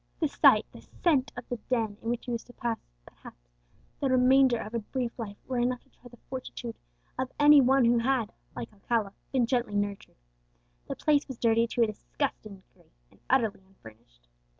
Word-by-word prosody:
The 320 - +2
sight, - - +5
the - - -13
scent 290 -6 0
of 245 - -7
the 245 - -3
den 225 -5 0
in 225 - -4
which 240 0 -2
he 245 - -4
was 235 -1 -3
to 245 - -15
pass, 235 -2 -2 0.3
perhaps, - - -16 0.5
the 275 - 0
remainder 255 0 +5
of 215 0 -7
a 235 - 0
brief 240 +2 -3
life, 205 -3 -6
were 255 -2 -2
enough 245 +1 0
to - - -31
try 245 - -17
the 240 - -16
fortitude 250 -2 -6 0.4
of 260 0 -2
any 295 -1 +8
one 265 0 +4
who 235 0 +4
had, 240 -2 0 0.2
like - - -6
Alcala, 210 0 -1 0.2
been 255 -3 +2
gently 240 -3 -1
nurtured. 205 -1 -3 0.7
The - - -4
place 295 -1 +2
was 265 -4 -7
dirty 230 0 +3
to 235 +1 +1
a - - +5
disgusting 215 0 -4
degree, - - -27 0.2
and - - -24
utterly 230 -7 +2
unfurnished. 110 - -18
240 Hz, 195 wpm, -28 LUFS, 215-260 Hz, 0.7 s, any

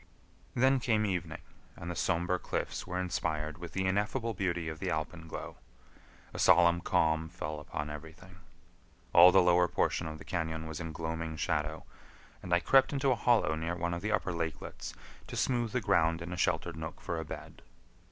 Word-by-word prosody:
Then 130 +2 +4
came 110 -3 +2
evening, 90 -5 -3 0.3
and 85 +1 -6
the - - -5
somber 85 +3 0
cliffs - - -3
were 90 0 -2
inspired 80 -3 -2
with 90 -1 -8
the 95 -1 0
ineffable 105 +5 0
beauty 85 -4 -1
of 80 -1 -5
the - - -2
alpenglow. 80 +1 -4 0.8
A - - -6
solemn 85 0 +5
calm 80 -1 +1
fell 75 -3 -5
upon 75 0 -5
everything. 80 +4 -10 0.8
All 90 +1 +10
the 95 0 +6
lower 90 0 +5
portion 85 - 0
of 80 0 -6
the - - -12
cañon 80 -2 -3
was 80 -1 -5
in 80 -1 -5
gloaming 80 0 -4
shadow, 75 -1 -1 0.6
and 90 - -8
I 85 - +5
crept 135 +6 +5
into 135 -1 +1
a - - +3
hollow 115 -8 +3
near 80 +2 -2
one 85 0 -2
of 85 - -3
the 105 - -2
upper 95 -4 0
lakelets 80 -4 -5 0.3
to - - -7
smooth 120 -3 0
the 125 - 0
ground 85 -5 +2
in 85 +1 -6
a - - -3
sheltered 85 -1 0
nook 80 +1 -6
for 85 - -3
a - - -3
bed. 75 - -9
85 Hz, 185 wpm, -31 LUFS, 80-95 Hz, 0.8 s, All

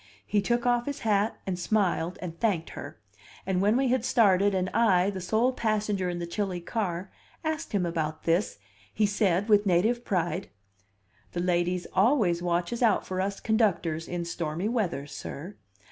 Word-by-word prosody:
He 205 - +1
took 240 +4 0
off 240 0 +2
his 285 0 -4
hat, 210 0 +1
and 185 -2 -3
smiled, 180 -3 0
and 170 -2 -6
thanked 190 -8 0
her; - - -8 0.5
and 185 -1 0
when 210 +4 +3
we 265 -1 +2
had 255 -2 +1
started 200 -5 +4
and 185 0 0
I, 200 -4 +3
the 190 -2 -6
sole 225 +8 +1
passenger 210 -5 0
in 175 - -3
the 175 - -3
chilly 185 +1 -2
car, 180 0 -3 0.3
asked 315 0 -3
him 200 -5 +1
about 160 -2 -3
this, 170 - +1 0.3
he 215 - +1
said 200 -1 +1
with 205 -1 +4
native 215 +7 +2
pride: 180 -3 -1 0.8
"The 175 - -2
ladies 180 0 0
always 195 -5 +3
watches 175 +7 -1
out 225 -4 +3
for 185 0 -2
us 195 +1 -2
conductors 175 -8 +1
in 175 -1 -3
stormy 170 +2 -3
weather, 210 - -1
sir. 145 +5 -8
190 Hz, 170 wpm, -28 LUFS, 175-220 Hz, 0.8 s, started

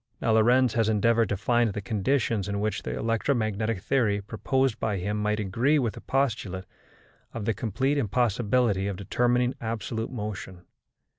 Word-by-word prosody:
Now 115 - +1
Lorentz 120 +3 +4
has 115 -2 +2
endeavoured 115 0 +2
to 105 - -1
find 120 +2 +2
the 105 - -3
conditions 105 +1 0
in 100 0 -2
which 110 +1 -1
the - - -4
electromagnetic 110 -3 0
theory 110 -3 +1
proposed 115 +4 -1
by 105 -3 -1
him 100 +3 -2
might 105 0 0
agree 115 +9 +2
with 120 -6 0
the - - -10
postulate 110 -9 -1 0.7
of 110 -3 -4
the 115 - +1
complete 125 +7 0
impossibility 115 -2 +1
of 100 - -2
determining 125 +5 +1
absolute 115 0 -3
motion. 105 -6 -6
110 Hz, 155 wpm, -27 LUFS, 105-120 Hz, 0.7 s, Lorentz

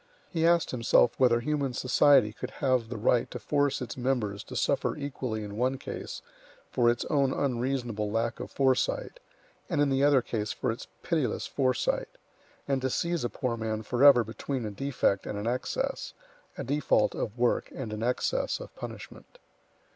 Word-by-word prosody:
He 165 -1 +2
asked 170 -1 +3
himself 120 -1 +4
whether 120 -2 +4
human 140 -1 -1
society 125 -3 +4
could - - -6
have 130 -4 +1
the 120 - -4
right 115 +2 +2
to - - -6
force 145 -3 0
its 125 - -6
members 120 -6 -1
to - - -9
suffer - - +1
equally 130 -6 -4
in 105 0 -7
one 130 +3 +1
case - - -7 0.5
for 120 -2 +3
its 120 0 0
own 140 -3 +2
unreasonable 120 -5 -1
lack 115 +2 -1
of - - -6
foresight, 140 - 0 0.5
and 165 -5 0
in 145 -1 +3
the 135 +1 +2
other 140 -4 +5
case 105 -3 -2
for - - -1
its 115 - -7 0.2
pitiless 155 - 0
foresight; 130 -3 -1 0.5
and 135 -1 0
to 130 - 0
seize 170 +4 -1
a 120 - 0
poor 125 0 -2
man 110 -1 -3
forever 125 +2 +6
between 120 +3 -4
a 105 - -4
defect 125 -4 0
and 105 - -4
an 105 - -4
excess, 125 +2 -2 0.4
a - - -3
default 145 +5 +2
of 110 +3 -4
work 120 0 +1
and 115 -5 -6
an 105 - -5
excess 125 - 0
of - - -10
punishment. - - -9
125 Hz, 175 wpm, -28 LUFS, 115-140 Hz, 0.5 s, forever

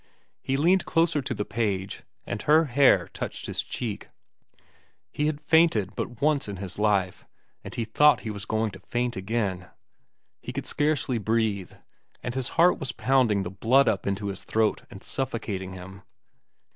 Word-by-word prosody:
He 135 - -1
leaned 180 +6 +3
closer 165 -2 +2
to - - -3
the 105 - -2
page, 100 -5 -2 0.2
and - - -4
her 155 +2 +4
hair 125 - +4
touched - - -5
his - - -2
cheek. 110 -5 -5 1.0
He 150 - 0
had 155 -1 -2
fainted 150 - +3
but 120 +2 -5
once 150 -4 +2
in 100 - -5
his 95 0 -6
life, 100 -3 0 0.4
and - - -8
he 115 - -2
thought 150 +7 +4
he 110 - -4
was 105 0 -6
going 110 -1 0
to 95 - -11
faint 120 0 -2
again. 95 -2 -2 0.7
He - - -7
could - - -4
scarcely 145 -5 0
breathe, 110 -3 -1 0.5
and 125 - -3
his 130 -1 -1
heart 175 +2 +5
was 135 -1 -3
pounding 110 -3 +2
the 90 - -5
blood 120 +8 +3
up 105 -4 0
into 100 +1 -2
his 95 - -5
throat 110 -1 +1
and 100 - -11
suffocating 105 -8 -3
him. 95 +1 -10
110 Hz, 170 wpm, -26 LUFS, 100-135 Hz, 1.0 s, heart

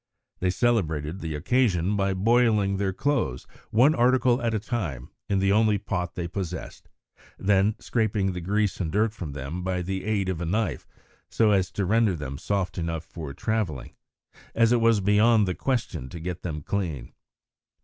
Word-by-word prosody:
They 90 - +1
celebrated 90 -7 0
the 80 -3 -4
occasion 100 - +1
by 95 -1 0
boiling 105 -1 +3
their 95 -1 0
clothes, 105 - -1 0.2
one 130 +8 +5
article 125 -1 +3
at 115 -2 0
a - - 0
time, 95 - -4 0.2
in 100 - +2
the 95 +1 +2
only 105 0 +3
pot 90 -2 -3
they 85 -2 -3
possessed, 90 0 -6 0.5
and - - -8
then 100 +1 +3
scraping 105 -4 0
the 90 - -5
grease 105 +3 0
and 85 -5 -2
dirt 105 +2 +1
from 80 -10 -6
them 75 +5 -5
by 90 0 -2
the 95 +1 -3
aid 105 -3 0
of 90 -3 -2
a - - -2
knife, 95 - -1 0.4
so 110 -2 +3
as 95 -3 +2
to 100 - -1
render 110 0 +3
them 70 -3 -6
soft 95 0 -2
enough 80 -1 -3
for 80 -4 -7
travelling, 105 - -2 0.6
as 115 0 +4
it 120 -1 +3
was 115 -2 +4
beyond 105 +2 +4
the 90 - 0
question 120 - -2
to 85 - -8
get 90 +1 -5
them 75 -4 -5
clean. 80 -12 -3
95 Hz, 180 wpm, -26 LUFS, 85-110 Hz, 0.6 s, one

